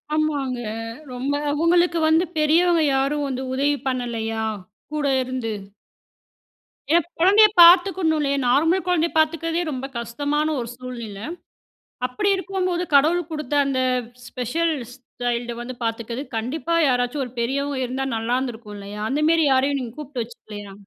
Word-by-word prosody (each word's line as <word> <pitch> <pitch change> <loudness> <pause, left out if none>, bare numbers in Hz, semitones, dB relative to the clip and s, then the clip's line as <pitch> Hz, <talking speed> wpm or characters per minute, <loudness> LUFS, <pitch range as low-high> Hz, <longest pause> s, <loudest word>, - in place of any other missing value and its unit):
ஆமாங்க. 285 -5 -1 0.5
ரொம்ப 265 +3 -2 0.2
அவங்களுக்கு 340 +2 +3
வந்து 325 +3 +4
பெரியவங்க 330 +2 +4
யாரும் 285 +2 0
வந்து 260 0 -3
உதவி 285 +2 +1
பண்ணலையா? 225 -3 -2 0.5
கூட 300 -1 -2 0.2
இருந்து. 250 -3 -3 1.4
ஏன்னா 340 -1 +3
குழந்தையை 410 +5 +7
பார்த்துக்கணும் 350 -2 +6
இல்லையே, 280 -1 0
நார்மல் 325 +8 +3
குழந்தையை 340 -2 +1
பார்த்துக்கிறதே 330 +2 +1
ரொம்ப 260 0 -4
கஷ்டமான 285 +6 -1
ஒரு 235 -1 -4
சூழ்நிலை. 235 -4 -7 0.8
அப்படி 255 +11 -1
இருக்கும்போது 370 -1 -2
கடவுள் 320 +4 +4
கொடுத்த 300 -2 -4
அந்த 260 -2 0 0.5
ஸ்பெஷல் 315 +7 -1 0.2
ஸ்டைல்டை 245 -2 -4
வந்து 250 +1 -6
பார்த்துக்கிறது 230 +4 -3
கண்டிப்பா 300 +9 -2
யாராச்சும் 250 +2 0
ஒரு 250 - -10
பெரியவங்க 275 +3 -1
இருந்தா 265 +2 -3
நல்லா 230 +3 0
இருந்துருக்கும் 230 -5 -6
இல்லையா? 200 +1 -8
அந்தமாதிரி 310 +3 +3
யாரையும் 275 +2 +2
நீங்க 240 -1 -6
கூப்பிட்டு 280 -5 -4
வச்சுக்கலையா? 210 -3 -10
275 Hz, 125 wpm, -22 LUFS, 245-325 Hz, 1.4 s, குழந்தையை